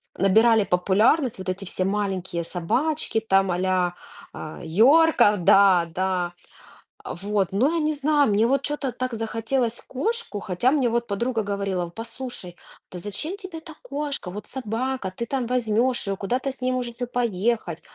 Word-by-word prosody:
набирали 220 +3 +4
популярность 210 - +2
вот 185 0 -5
эти 190 +2 -4
все 185 0 -2
маленькие 190 -4 -2
собачки, 235 - -1
там, 195 -3 +2
а-ля, 180 0 +1 0.4
а, 155 - -8
йорков 220 - +4
Да, 185 -2 +6
да. 180 -1 -1 0.7
Вот, 195 +1 -2
но 260 +11 +2
я - - +1
не 310 0 +1
знаю, 290 -1 +2
мне 210 +2 +3
вот 275 +3 +1
чё-то 290 -3 -2
так 255 0 -4
захотелось 230 +2 -1
кошку, 435 - -3
хотя 195 +7 +1
мне 275 -5 +2
вот 235 +1 -1
подруга 225 +3 -1
говорила: 200 -3 -2
"Послушай, 225 -2 -8 0.3
да 180 - -7
зачем 300 - -5
тебе 375 -5 -8
та 320 -1 -11
кошка? 280 -9 -4
Вот 210 +1 -8
собака 250 -4 -3
ты 235 - -3
там 255 0 -2
возьмёшь 245 0 +1
её, 195 0 -1
куда-то 250 +8 -1
с 265 - -13
ней 255 0 +1
можете 245 -1 -3
поехать". 225 -6 -1
225 Hz, 155 wpm, -24 LUFS, 190-260 Hz, 0.7 s, Да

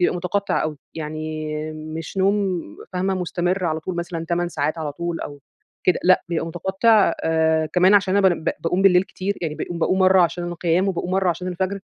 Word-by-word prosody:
بيبقى 180 - +2
متقطع 200 +3 -1
أوي 155 -1 -3 0.2
يعني 155 0 -4 0.2
مش 155 +3 -7
نوم 195 -2 +1 0.3
فاهمة 190 +1 0
مستمر 180 +1 -1
على 160 -2 -1
طول 180 +2 -5
مثلًا 170 -1 -4
8 175 0 0
ساعات 155 0 -2
على 150 -2 -3
طول 170 +2 -4
أو 145 -1 -7 0.5
كده 180 - +4
لأ، 185 +1 +4
بيبقى 165 -1 -1
متقطع 190 +4 +3
آآ 160 -1 +2
كمان 185 +3 +5
عشان 195 -1 +3
أنا 195 -1 +5
بان 170 -3 -2
باقوم 175 +3 -1
بالليل 180 -2 +6
كتير 195 +1 -4
يعني 155 -2 -2
باقوم 170 +2 -5
باقوم 185 +3 +1
مرّة 185 0 +5
عشان 175 0 +1
القيام، 175 +2 0
وباقوم 180 -1 -2
مرّة 190 0 +1
عشان 180 +2 -4
الفجر 190 +2 -2
175 Hz, 190 wpm, -22 LUFS, 160-190 Hz, 0.5 s, بالليل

